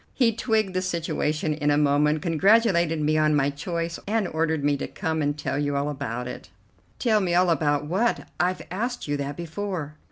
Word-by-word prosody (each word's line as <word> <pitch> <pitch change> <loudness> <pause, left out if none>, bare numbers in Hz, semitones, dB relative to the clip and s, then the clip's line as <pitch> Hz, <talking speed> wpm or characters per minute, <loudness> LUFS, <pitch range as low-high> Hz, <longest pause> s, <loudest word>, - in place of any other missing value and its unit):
He 235 -4 +3
twigged 220 -4 0
the 185 - 0
situation 160 -3 -1
in 150 -1 -1
a 145 - +3
moment, 150 +1 +2
congratulated 170 -1 +3
me 155 +1 +2
on 155 0 +3
my 140 0 +2
choice, 170 +3 -4
and 215 -2 +1
ordered 160 -2 -1
me 145 0 +2
to - - -4
come 160 -4 -2
and 145 0 0
tell 145 - -2
you 145 -1 -1
all 140 +1 0
about 125 -4 -4
it." - - -8 0.5
"Tell 220 -4 +2
me 180 -3 0
all 180 0 +4
about 145 -2 +1
what? 195 +10 0
I've 180 +1 0
asked 240 +4 -3
you 145 - 0
that 140 0 -4
before." 170 -2 -4
160 Hz, 195 wpm, -25 LUFS, 145-185 Hz, 0.5 s, all